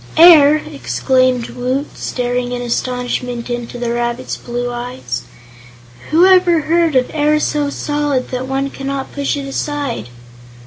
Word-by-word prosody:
"Air!" 315 -3 +8
exclaimed 255 -5 0
Woot, 255 +4 -3
staring 245 0 -2
in 245 - -3
astonishment 245 0 -3
into 240 0 -4
the 240 -1 -2
rabbit's 240 +1 -2
blue 245 0 -4
eyes; 240 - -5 0.9
"whoever 350 0 +5
heard 330 0 +1
of 255 -1 +2
air 300 0 +2
so 295 -1 0
solid 290 -3 -1
that 255 0 -3
one 270 +1 -2
cannot 275 0 -5
push 285 0 -1
it 280 - -4
aside?" 275 - -3
260 Hz, 130 wpm, -17 LUFS, 245-295 Hz, 0.9 s, Air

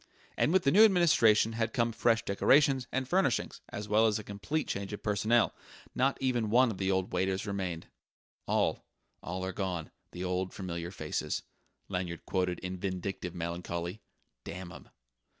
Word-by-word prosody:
And - - +2
with 190 0 +3
the 140 - +3
new 210 +8 +8
administration 155 - +5
had 115 0 -1
come 115 -3 +1
fresh 115 0 +2
decorations 135 +5 +3
and 130 0 -1
furnishings 180 -7 +1
as 105 0 -6
well 110 +2 +4
as 105 - +1
a 110 - -6
complete 105 +11 -3
change 100 0 -3
of 105 - -7
personnel: 110 +2 +2 0.4
not 135 +2 +1
even 120 -5 0
one 125 +2 +5
of 95 - -7
the 95 0 0
old 95 -1 0
waiters 95 +2 0
remained. 95 -5 -3 0.6
"'All, - - +1 0.4
all 95 +2 -4
are 95 - -4
gone, 90 -5 -3 0.2
the 90 - -6
old 90 0 -2
familiar 85 -3 -4
faces,'" 95 - -3 0.4
Lanyard 90 -3 -4
quoted 90 -2 0
in 90 0 -5
vindictive 95 -1 -4
melancholy 85 +2 -4 0.4
"damn 90 0 -7
'em!" - - -12
100 Hz, 165 wpm, -31 LUFS, 90-120 Hz, 0.6 s, new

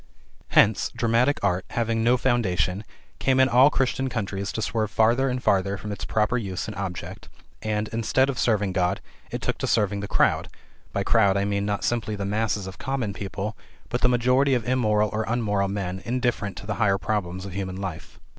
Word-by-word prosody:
Hence, 105 -1 +4
dramatic 120 +4 +1
art, 90 +1 +1
having 115 -1 0
no 120 +2 +4
foundation, 100 -7 0 0.4
came 130 -1 +2
in 130 - +6
all 130 +3 +6
Christian 130 -1 0
countries 100 -4 -3
to 110 - -3
swerve 110 -1 -1
farther 120 +5 +3
and 125 0 -3
farther 100 +1 +2
from 105 +2 -6
its 100 - -5
proper 110 +3 +1
use 95 -5 -4
and 110 - -6
object, 95 -3 -6 0.3
and, 105 0 -1
instead 115 +4 +1
of 135 -4 -3
serving 105 -5 +1
God, 90 +1 +1 0.3
it - - -5
took - - -2
to - - -1
serving 105 -2 +1
the 100 - -4
crowd - - +2 0.4
(by 100 - -1
crowd, 100 -3 +3
I 100 - +1
mean, 100 0 -1
not 105 -1 -1
simply 115 -3 -1
the 100 -1 -4
masses 105 0 -1
of 95 -1 -9
common 130 -7 -2
people, 100 +2 -4 0.3
but 120 0 -2
the 125 - +4
majority 125 +3 +3
of 120 -2 -2
immoral 105 -4 +2
or 110 +1 0
unmoral 105 -4 0
men, 95 -2 -3
indifferent 120 -5 -1
to - - -8
the 105 - -2
higher 100 -2 +3
problems 95 -3 -2
of 100 - -7
human 95 -1 -4
life). 95 -4 -7
105 Hz, 195 wpm, -25 LUFS, 100-120 Hz, 0.4 s, in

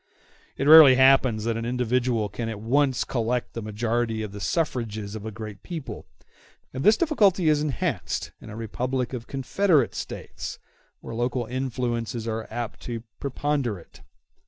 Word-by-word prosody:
It - - -1
rarely 155 -4 +10
happens 130 -4 +4
that 115 0 -1
an 115 - -3
individual 125 -2 0
can 115 +3 -5
at 110 -2 -5
once 130 +3 +2
collect 120 0 -2
the 115 - -4
majority 110 +1 -1
of 105 - -6
the 105 - -8
suffrages 110 -11 -2
of 110 0 -6
a - - -5
great 105 -2 -8
people; 165 -5 -7 0.7
and 130 +1 -4
this 215 +1 +6
difficulty 200 - +3
is 150 -1 +3
enhanced 140 - -2
in - - -11
a 105 - -8
republic 125 +3 -3
of 120 -2 -6
confederate 140 - +1
States, - - -6 0.4
where - - -8
local 120 +1 -1
influences 120 -2 -3
are 110 0 -3
apt 120 0 -5
to 115 -2 -6 0.2
preponderate. 135 - -3
120 Hz, 155 wpm, -25 LUFS, 110-135 Hz, 0.7 s, rarely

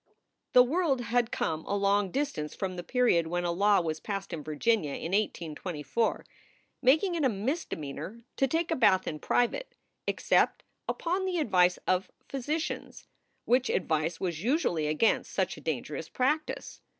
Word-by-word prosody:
The 250 - +9
world 280 -1 +1
had 240 0 +1
come 160 0 -1
a 200 - 0
long 200 0 +2
distance 270 - -2
from 190 -2 -3
the 175 - -4
period 175 -4 +2
when 175 +2 -1
a 175 - 0
law 200 +2 +4
was 160 -2 -3
passed 195 0 -4
in 155 -3 -4
Virginia 155 0 0
in 165 - -5
1824, 175 -1 -1 0.6
making 310 +8 +4
it 330 -3 -1
a 265 - +4
misde 250 - -2
meanor 155 +10 -7
to 270 - +3
take 330 +4 0
a - - +3
bath 195 -8 +4
in 155 - -3
private, 245 - 0 0.3
except - - +2 0.3
upon 365 +3 -1
the 370 -2 -1
advice 180 - +3
of 185 +1 +1 0.2
physicians, 300 +4 -3 0.4
which 250 +1 +3
advice 160 -1 0
was 170 -4 -2
usually 210 - +1
against 155 +9 +2
such - - 0
a - - -12
dan - - -2
gerous - - -7
practice. 300 +5 -1
205 Hz, 160 wpm, -29 LUFS, 170-265 Hz, 0.6 s, The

